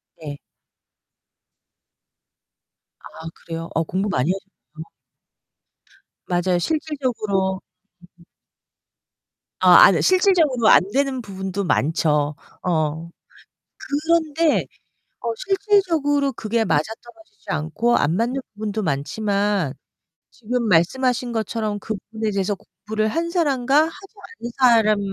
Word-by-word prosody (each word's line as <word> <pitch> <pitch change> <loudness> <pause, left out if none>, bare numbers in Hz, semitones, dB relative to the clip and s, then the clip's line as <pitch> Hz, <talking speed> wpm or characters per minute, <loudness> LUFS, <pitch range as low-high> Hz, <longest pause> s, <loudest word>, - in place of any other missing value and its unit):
네. 150 -3 -8 2.6
아 - - -13 0.2
그래요? 165 0 -7 0.2
공부 195 +3 -1
많이 140 -1 +1
하셨네요. 185 -4 -9 1.4
맞아요. 175 0 0
실질적으로 220 - -1 2.0
아, - - +8
아 - - +8
이 - - +3
드 - - +1
실질적으로 345 - +3
안 - - +7
되는 270 0 0
부분도 195 -2 -5
많죠. 150 -3 +1 0.3
어. 160 -1 -1 0.7
그런데 315 +1 +1 0.5
어 235 -2 -2
실질적으로 340 - +1
그게 225 0 -1
맞아 155 -7 +2 0.2
떨어지지 330 - -18
않고 160 +10 0
안 150 +4 +1
맞는 235 +5 0 0.2
부분도 215 0 -4
많지만 195 +2 -1 0.6
지금 245 +1 -3
말씀하신 245 +8 +1
것처럼 220 -2 -2
그 220 +2 -4 0.2
부분에 220 -1 -2
대해서 200 0 -1
공부를 215 +3 -4
한 330 +9 -2
사람과 285 -3 +2
하지 385 +4 -11 0.3
않은 240 - -6
사람 225 -5 +4
220 Hz, 230 characters per minute, -21 LUFS, 185-275 Hz, 2.6 s, 아